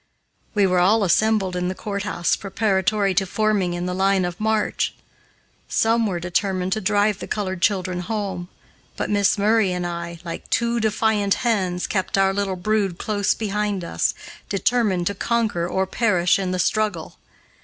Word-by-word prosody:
We 205 -1 +4
were 180 -1 +2
all 205 +5 +4
assembled 200 0 +2
in 180 0 -1
the 185 - -3
courthouse 200 -4 -1
preparatory 195 0 0
to 195 +1 +1
forming 200 -3 0
in 175 0 -3
the 180 - -2
line 190 0 +2
of 175 -1 -5
march. 215 0 0 0.7
Some 225 0 +2
were 180 -3 -2
determined 185 +1 -1
to 215 - -2
drive 205 0 +2
the - - -6
colored 190 -4 -3
children 185 -3 +1
home, 190 -2 -3 0.5
but - - -2
Miss 205 -1 +3
Murray 210 -1 +3
and 180 0 -2
I, 170 0 -5
like 165 - -7
two 235 0 +1
defiant 215 -2 +1
hens, 185 -6 0
kept 190 -1 -1
our 195 0 +3
little 200 -1 -1
brood 195 -1 0
close 205 -1 0
behind 210 -3 -2
us, 170 - -1 0.3
determined 200 -3 +1
to 200 - 0
conquer 210 -5 0
or 190 +1 0
perish 185 -3 +2
in 190 -1 -2
the 185 - -1
struggle. 205 -3 -1
195 Hz, 165 wpm, -22 LUFS, 180-215 Hz, 0.7 s, We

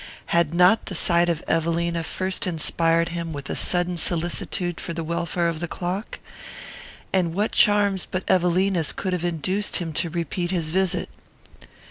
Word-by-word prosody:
Had 170 -3 +3
not 180 +6 +4
the 185 - -4
sight 170 +1 +3
of 165 -2 -1
Evelina 170 +1 0
first 185 +3 -2
inspired 165 0 +1
him 170 -1 -4
with 140 -1 -6
a - - -2
sudden 175 0 +2
solicitude 175 +1 -1
for 170 - -4
the 165 0 -4
welfare 170 +1 -1
of 165 -2 -2
the 175 - -3
clock? 185 +6 -4 1.0
And 175 -3 +1
what 210 +3 0
charms 205 -2 +3
but 185 0 -4
Evelina's 180 -2 +2
could 185 -2 -3
have 180 -2 -2
induced 185 +4 -1
him 165 -4 -2
to 170 - 0
repeat 175 +1 -3
his 170 -4 -1
visit? 190 0 0
175 Hz, 160 wpm, -23 LUFS, 165-185 Hz, 1.0 s, not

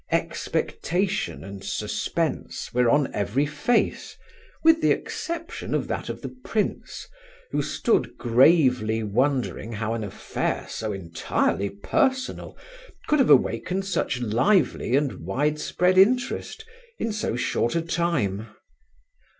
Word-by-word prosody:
Expectation 195 +4 -1
and 100 0 -9
suspense - - -3
were 125 -1 +3
on 145 +1 +2
every 105 +8 0
face, 150 +11 0 0.5
with 325 0 +6
the - - +3
exception 335 0 -3
of - - -1
that - - -3
of - - -6
the - - -6
prince, 215 -2 -3 0.4
who - - +1
stood - - 0
gravely 125 -3 +4
wondering 120 +1 0
how 110 +1 -2
an 115 -1 -3
affair 100 - -3
so 110 -1 -4
entirely 95 +1 -1
personal 260 - -1 0.5
could 300 - +2
have 265 - +4
awakened 150 +7 +3
such 185 -9 -1
lively 125 - +2
and 140 -1 0
widespread 150 +6 +1
interest 250 - +2 0.3
in 230 - -2
so 210 - -2
short 120 0 0
a 165 - +2
time. 150 - -1
140 Hz, 120 wpm, -25 LUFS, -, 0.5 s, with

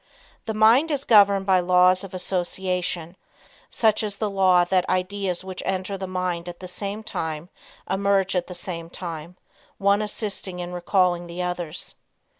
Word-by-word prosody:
The 220 - -2
mind 230 +9 +5
is 285 -3 -1
governed 200 -4 +5
by 190 -1 +4
laws 180 +1 +4
of 190 -1 -8
association, 180 -1 -2 0.5
such 220 -2 +2
as 210 -2 -3
the 215 -2 -1
law 185 -2 +4
that 180 0 +1
ideas 185 0 -1
which 185 -1 -6
enter 190 +1 -2
the 190 -1 -5
mind 180 -2 -2
at 175 - -9
the 185 - -7
same 200 +4 -5
time 160 -6 -4 0.4
emerge 195 -1 +1
at 180 -1 0
the 180 - -8
same 170 -2 -4
time, 170 0 -7 0.4
one 200 +1 +3
assisting 205 -3 -3
in 175 0 -5
recalling 175 -1 +1
the 175 +1 -4
others. 180 -2 -4
185 Hz, 160 wpm, -24 LUFS, 180-200 Hz, 0.5 s, mind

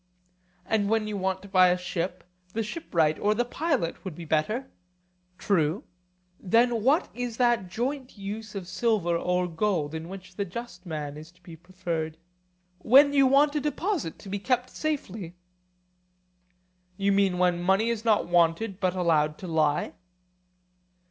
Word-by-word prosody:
And 205 -1 +1
when 220 -1 +2
you 215 -1 -4
want 190 -1 -2
to - - -10
buy 185 -2 +5
a 180 0 +3
ship, 180 0 -4 0.3
the 225 - -1
shipwright 170 - 0
or 210 +1 +2
the 240 +2 +1
pilot 275 - -1
would 185 -5 -6
be 170 - -8
better? 215 - 0 0.7
True. 165 -2 +1 0.6
Then 230 +4 +2
what 285 +7 +3
is 245 -2 -4
that 240 -7 +2
joint 255 +4 -3
use 210 +2 -6
of 190 -3 -5
silver 190 -4 +1
or 180 +1 0
gold 165 -3 -1
in 160 +1 -6
which 185 -1 -10
the 200 - 0
just 195 -1 -8
man 150 -3 -5
is 155 +2 -11
to 180 0 -29
be 170 -2 -10
preferred? 170 -2 -4 0.6
When 275 +8 +6
you 275 -2 +5
want 285 +3 +4
a 300 - +1
deposit 300 - -2
to 200 - -11
be 200 +1 -2
kept 250 +3 0
safely. 220 - -4 1.6
You 200 0 +2
mean 195 -2 +2
when 180 -1 +2
money 195 +6 +2
is 225 -2 -3
not 220 -3 +2
wanted, 175 +4 +2
but 185 -2 0
allowed 155 -4 +2
to 185 - -8
lie? 155 -2 +1
190 Hz, 160 wpm, -27 LUFS, 175-230 Hz, 1.6 s, When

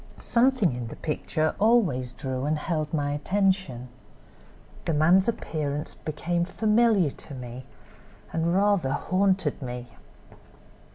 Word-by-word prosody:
Something 235 - +2
in 120 -1 -5
the - - -8
picture 155 0 -1
always 195 - +3
drew 130 +1 -4
and 155 +1 +1
held 155 -1 -2
my 145 -2 0
attention. 185 -5 0 1.0
The 165 - 0
man's 175 +6 +4
appearance 150 -9 -2
became 170 +3 -2
familiar 215 -3 +3
to 140 - -11
me, 125 0 -8 0.7
and 165 +1 +1
rather 195 -8 +2
'haunted' 185 -2 +1
me. 125 -1 -6
155 Hz, 115 wpm, -26 LUFS, 140-195 Hz, 1.0 s, man's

